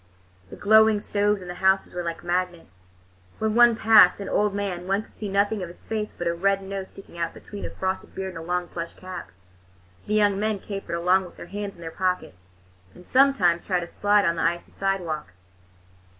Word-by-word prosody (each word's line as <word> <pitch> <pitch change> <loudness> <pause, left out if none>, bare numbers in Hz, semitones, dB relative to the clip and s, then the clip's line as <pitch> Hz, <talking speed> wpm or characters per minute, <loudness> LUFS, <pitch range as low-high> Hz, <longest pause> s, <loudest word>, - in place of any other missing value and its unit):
The - - -9
glowing 220 0 +5
stoves 205 -1 0
in - - -10
the 175 - -5
houses 190 +1 +2
were 180 - -3
like 170 0 -5
magnets. 175 - -3 0.5
When 220 -1 0
one 240 0 +6
passed 215 -5 +6
an 200 - -5
old 210 0 +2
man, 185 -3 -3
one 195 +2 +1
could - - -22
see 210 - -6
nothing 200 +1 +1
of 180 - -4
his 170 - -13
face 215 -1 -3
but 175 - -6
a 170 - +1
red 195 +3 +1
nose 195 0 -5
sticking 195 -3 -13
out 165 -1 -2
between 205 -1 -8
a - - -4
frosted 190 0 -4
beard 190 0 -3
and 180 - -8
a - - -7
long 180 +1 -2
plush 170 -1 -6
cap. 185 0 -8 0.8
The 210 - 0
young 205 -2 +3
men 215 0 0
capered 195 -3 -5
along 180 +2 +2
with 180 - -14
their - - -8
hands 200 +2 -6
in 170 - -15
their 165 -1 -6
pockets, 170 - -3 0.5
and 180 - -15
sometimes 235 -11 +3
tried 180 -3 +1
a - - -5
slide 205 +3 +2
on 170 -1 +1
the - - -1
icy 170 +1 -1
sidewalk. 170 - -2
190 Hz, 210 wpm, -25 LUFS, 175-205 Hz, 0.8 s, one